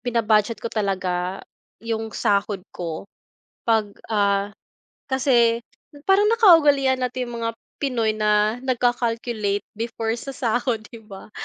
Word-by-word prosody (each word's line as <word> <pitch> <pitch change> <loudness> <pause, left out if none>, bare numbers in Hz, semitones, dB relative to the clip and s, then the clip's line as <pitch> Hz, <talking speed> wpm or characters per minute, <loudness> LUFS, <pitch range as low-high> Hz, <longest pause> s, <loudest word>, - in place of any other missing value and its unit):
bina-budget 230 -2 +1
ko 230 - -3
talaga 185 -3 -2 0.4
'yung 225 -1 -2
sahod 200 -1 0
ko. 165 0 -5 0.6
'Pag 220 -3 +1 0.2
ah, 200 -1 +1 0.6
kasi 240 -3 +2 0.4
parang 390 +2 +4
nakaugalian 295 - +5
nating 250 -1 -3
mga 230 -1 -3 0.2
Pinoy 235 -6 0
na 210 0 +2
nagka-calculate 235 -4 0
before 225 0 -3
sa 275 - -6
sahod, 240 -1 0
'di 230 - -10
ba? 195 +1 -11
230 Hz, 110 wpm, -23 LUFS, 210-250 Hz, 0.6 s, nakaugalian